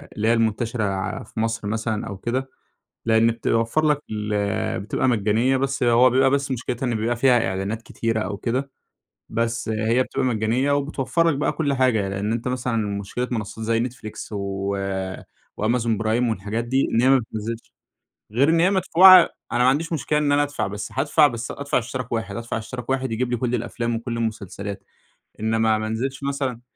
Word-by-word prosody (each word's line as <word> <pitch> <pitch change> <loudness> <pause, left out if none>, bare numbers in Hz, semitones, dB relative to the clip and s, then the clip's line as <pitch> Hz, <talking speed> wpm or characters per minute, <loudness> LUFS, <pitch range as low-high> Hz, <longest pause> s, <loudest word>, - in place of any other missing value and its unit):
اللي 110 +1 -1
هي 115 - +5
المنتشرة 115 0 0
ع 95 -1 -2
في 110 - -8
مصر 115 -2 -1
مثلًا 110 0 -2
أو 100 - -6
كده، 130 +5 -2 0.6
لأن 115 0 +4
بتوفر 115 +6 0
لك 150 -1 +2
ال 105 -2 -1
بتبقى 105 +5 -1
مجانية 115 +3 +2
بس 135 -1 -1
هو 120 +2 +5
بيبقى 135 +2 +4
بس 140 0 0
مشكلتها 125 +1 -3
إن 120 -2 0
بيبقى 115 +2 0
فيها 120 -2 +3
إعلانات 100 +4 -3
كتيرة 115 -1 -2
أو 100 - -3
كده، 130 +5 -2 0.6
بس 115 0 -1
هي 110 +3 +1
بتبقى - - -2
مجانية 120 +4 +1
وبتوفر 145 +3 +1
لك 145 - +1
بقى 150 - +1
كل 145 -4 -1
حاجة، 120 -7 +2
لأن 100 +3 -2
أنت 115 +2 -2
مثلًا 125 -2 -1 0.2
مشكلة 125 +5 -3
منصات 110 -1 -4
زي 115 +1 +1
Netflix 110 -2 -9
و 100 0 -3 0.9
وAmazon 115 0 +1
Prime 115 +2 +1
والحاجات 110 +2 -2
دي 130 +3 +1
إن 115 - +3
هي 130 - +4
ما 135 -1 +6
بتنزلش 115 0 -6 0.6
غير 135 +7 +3
إن 165 0 +3
هي 180 +3 +4
مدفوعة 185 -1 +7 0.2
أنا - - 0
ما 130 - +6
عنديش 160 +5 0
مشكلة 150 0 0
إن 145 -1 +1
أنا 145 0 +4
ادفع 145 -8 -2
بس 105 +1 -6
هادفع 145 +3 +4
بس 115 -2 -5
ادفع 140 0 -1
اشتراك 125 +1 -4
واحد 115 -4 -3
ادفع 115 -1 -3
اشتراك 125 +3 -7
واحد 130 -2 0
يجيب 125 +2 -1
لي 120 - +1
كل 125 +1 0
الأفلام 120 0 -2
وكل 115 0 -4
المسلسلات، 100 -3 -4 0.6
إنمَّا 110 0 +2
ما 110 0 -3
انزلش 130 +5 -3
مثلًا 135 -4 -2
115 Hz, 185 wpm, -23 LUFS, 110-130 Hz, 0.9 s, مدفوعة